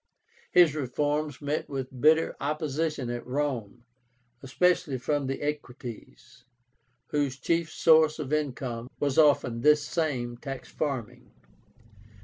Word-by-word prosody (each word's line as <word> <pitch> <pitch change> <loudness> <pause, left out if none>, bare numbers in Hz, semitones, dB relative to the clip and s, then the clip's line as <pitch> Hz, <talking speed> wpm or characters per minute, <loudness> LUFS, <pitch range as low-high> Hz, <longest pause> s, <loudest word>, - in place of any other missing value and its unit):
His 175 -4 +6
reforms 145 +1 -2
met 145 +2 -2
with 130 -2 -5
bitter 160 +2 +4
opposition 150 -2 -2
at 120 0 -4
Rome, 125 -5 -3 0.6
especially 150 +1 +1
from 145 +2 -1
the 135 +2 -3
Equites, 125 - -7 0.7
whose 140 -3 -1
chief 165 +4 0
source 160 -1 +4
of 150 -2 -4
income 130 -5 -2
was 145 0 +1
often 140 -6 +3
this 150 +2 +5
same 125 -8 -2
tax 135 +1 -7
farming. 125 -5 -4
145 Hz, 115 wpm, -28 LUFS, 125-155 Hz, 0.7 s, His